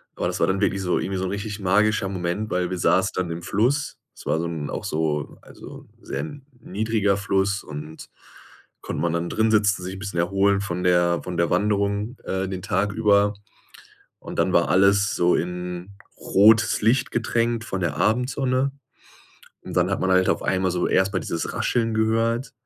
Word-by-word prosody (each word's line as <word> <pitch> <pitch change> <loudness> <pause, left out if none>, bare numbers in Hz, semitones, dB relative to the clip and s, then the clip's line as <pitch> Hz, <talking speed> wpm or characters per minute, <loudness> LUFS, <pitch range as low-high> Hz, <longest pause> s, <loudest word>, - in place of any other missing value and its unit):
aber - - -3
das - - -3
war - - +3
dann 95 +1 0
wirklich 95 -1 +1
so 90 -1 0
irgendwie 95 0 -3
so 95 - -2
'n - - -2
richtig 105 +1 -4
magischer 100 +1 +2
Moment, 95 +3 -3
weil 90 -1 -1
wir 90 - -2
saßen 95 +4 +2
dann 90 -2 -1
im 85 +1 -5
Fluss. 125 +8 0 0.2
Es - - -14
war 80 - 0
so 85 - -2
'n 80 -4 -4
auch - - -4
so 75 -2 -2
also, - - -12 0.2
sehr - - -4 0.4
niedriger 105 -1 0
Fluss 100 0 0
und 75 +1 -9 0.7
konnte 75 - -4
man 85 -1 0
dann 85 0 -2
drinsitzen, 105 -3 +2
sich 95 - -5
'n - - -9
bisschen 100 -4 -5
erholen 100 +3 +2
von 90 -3 -3
der 90 -1 +3
von 90 -2 -5
der 85 0 +2
Wanderung, 100 +4 0
äh, 95 0 -2
den 95 -1 -5
Tag 100 0 0
über. 105 -1 +3 0.9
Und - - -9
dann - - +2
war - - +3
alles 100 +2 +3
so 90 0 +3
in 90 +2 -4 0.3
rotes 110 +3 +4
Licht 125 +4 +2
getränkt 115 0 0
von 95 -4 -4
der 75 -4 -1
Abendsonne. 130 - +1 0.9
Und - - -8
dann - - +2
hat - - -1
man 95 - 0
halt 95 0 +4
auf - - +1
einmal 95 -1 0
so 90 - 0
erst 95 +2 +2
mal 95 - 0
dieses 85 - -3
Rascheln 115 -2 0
gehört 115 +3 0
100 Hz, 190 wpm, -23 LUFS, 90-110 Hz, 0.9 s, rotes